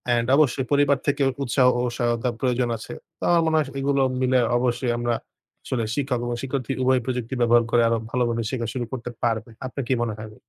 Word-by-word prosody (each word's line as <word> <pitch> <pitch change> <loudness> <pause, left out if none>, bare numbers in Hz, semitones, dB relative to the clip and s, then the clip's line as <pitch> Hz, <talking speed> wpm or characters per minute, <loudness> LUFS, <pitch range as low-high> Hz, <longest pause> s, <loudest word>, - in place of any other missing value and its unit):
and 120 0 +1
অবশ্যই 140 -3 +2
পরিবার 145 0 +4
থেকে 145 0 +1 0.2
উৎসাহ 125 0 +3
ও - - +1 0.2
সহায়তা 120 +1 0
প্রয়োজন 125 -1 0
আছে। 110 - -9 0.2
তো - - -10
আমার 170 -1 +5
মনে 160 0 +1
হয় 155 -3 +1
স - - -8
এগুলো 140 0 +1 0.2
মিলে 130 0 +3 0.2
অবশ্যই 120 0 0
আমরা 120 0 0 0.5
আসলে 120 -3 -1
শিক্ষক 135 -4 -1
এবং 120 0 -2
শিক্ষার্থী 135 -1 -2
উভয় 130 0 +3
প্রযুক্তি 125 -1 -3
ব্যবহার 120 0 +5
করে 120 - +4
আরো 115 - +2
ভালোভাবে 120 -2 0
শিক্ষা 120 -3 -2
শুরু 125 -2 -2
করতে 125 -2 -5
পারবে। 115 -1 0 0.2
আপনার 130 +2 -4
কী - - +4
মনে 115 -2 -2
হয়? 110 0 -9
125 Hz, 205 wpm, -24 LUFS, 120-135 Hz, 0.5 s, আমার